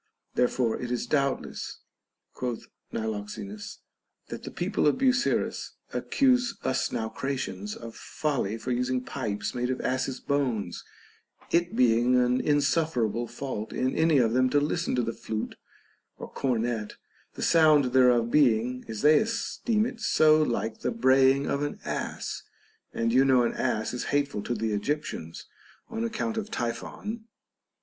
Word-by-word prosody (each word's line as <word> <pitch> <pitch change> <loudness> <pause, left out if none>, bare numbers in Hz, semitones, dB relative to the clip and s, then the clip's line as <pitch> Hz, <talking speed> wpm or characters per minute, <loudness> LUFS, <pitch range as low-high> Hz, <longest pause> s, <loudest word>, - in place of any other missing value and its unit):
Therefore 125 -2 +1
it 125 - -4
is 125 -1 -1
doubtless, 140 -2 -1 0.6
quoth 125 -3 -4 0.3
Niloxenus, 105 -1 -5 0.5
that - - -6
the - - -7
people - - 0
of 145 - +3
Busiris 255 -1 +1 0.2
accuse 250 -3 +2
us 130 - 0
Nau 110 - -2
cratians 105 -7 -4
of 115 -1 -9
folly 135 -8 -2
for 120 +3 -4
using 125 +1 0
pipes 110 -6 -3
made 125 0 -1
of 130 - -1
asses' 130 0 -1
bones, 125 -10 -1 0.7
it 175 +1 +1
being 120 +1 +4
an 125 0 +3
insufferable 145 -6 +1
fault 120 -3 -5
in 130 0 0
any 160 -2 +4
of 115 -3 +3
them 130 +1 +3
to 145 - +3
listen 155 +1 -1
to 125 - +1
the 115 - -2
flute 110 0 -4 0.6
or - - -8
cornet, 115 -4 -1 0.4
the - - -4
sound 150 -6 +5
thereof 125 -3 +4
being 125 -2 +3
(as 110 +1 -5
they 150 +1 +7
esteem 225 -1 0
it) 240 0 -5
so 155 0 +5
like 115 -5 -1
the - - -1
braying 135 - +4
of 140 - -1
an 145 - -3
ass; - - -4 0.5
and 115 0 0
you 130 +2 +6
know 130 -2 +4
an 120 - 0
ass 110 -3 -1
is 125 - -3
hateful 145 -7 0
to 120 - -2
the 110 0 -1
Egyptians 105 - -3 0.5
on 225 0 -2
account 230 0 -2
of 215 -1 -3
Typhon. 215 - -4
130 Hz, 150 wpm, -27 LUFS, 115-150 Hz, 0.7 s, they